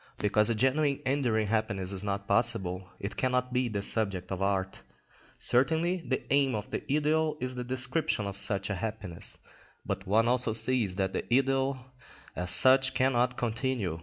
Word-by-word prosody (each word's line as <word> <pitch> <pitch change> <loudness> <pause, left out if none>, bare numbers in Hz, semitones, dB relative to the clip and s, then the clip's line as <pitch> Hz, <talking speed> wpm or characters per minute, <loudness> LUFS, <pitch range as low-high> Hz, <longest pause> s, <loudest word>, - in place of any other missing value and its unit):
Because 105 +1 +2
a 115 - +1
genuine 140 +4 +1
enduring 125 -5 0
happiness 105 -3 -1
is 95 0 -3
not 100 0 -3
possible, 100 -4 0
it 100 - -6
cannot 125 -1 -1
be 125 0 +1
the 100 -2 -3
subject 100 -5 -1
of 95 0 -4
art. 95 -1 -1 0.6
Certainly 160 +8 +1
the 130 - -1
aim 135 -3 +2
of 105 0 -6
the - - -3
idyll 155 +1 +1
is 125 0 -3
the 125 -1 -5
description 130 -2 0
of 100 -1 -5
such 100 0 +3
a - - -1
happiness, 105 -6 -3 0.5
but 95 - -4
one 110 +4 +3
also 125 -2 +2
sees 110 -3 +1
that 95 -1 -2
the - - -5
idyll 135 +1 +1 0.6
as 90 0 -3
such 130 +6 +6
cannot 125 -2 +1
continue. 115 -7 -2
115 Hz, 165 wpm, -29 LUFS, 100-130 Hz, 0.6 s, such